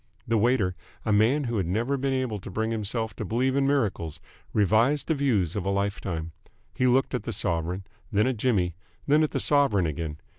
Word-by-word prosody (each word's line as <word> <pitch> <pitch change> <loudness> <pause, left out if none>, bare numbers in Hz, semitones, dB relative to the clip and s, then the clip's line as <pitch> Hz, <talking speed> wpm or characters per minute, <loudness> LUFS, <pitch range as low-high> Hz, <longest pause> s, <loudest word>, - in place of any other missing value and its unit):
The 115 - +1
waiter, 110 -5 +2 0.3
a 110 - +1
man 115 +8 +3
who 120 -3 -2
had 95 -4 0
never 115 +9 0
been 135 0 -1
able 130 -5 -1
to - - -9
bring 110 +4 -1
himself 110 +1 -2
to - - -3
believe 125 +6 0
in 140 -1 +2
miracles, 105 - 0 0.3
revised 110 +8 +3
the 160 - +2
views 115 - +1
of 100 - -1
a 95 - -1
life 100 0 -1
time. 85 -3 -4 0.4
He 130 -2 +1
looked 130 +2 +2
at - - 0
the - - -4
sovereign, 85 +3 -1 0.3
then 105 +1 +3
at 130 -2 0
Jimmy, 100 -7 +1 0.3
then 150 +2 +4
at 155 - +2
the - - -2
sovereign 140 -11 +3
again. 80 -1 -3
110 Hz, 210 wpm, -26 LUFS, 95-130 Hz, 0.4 s, then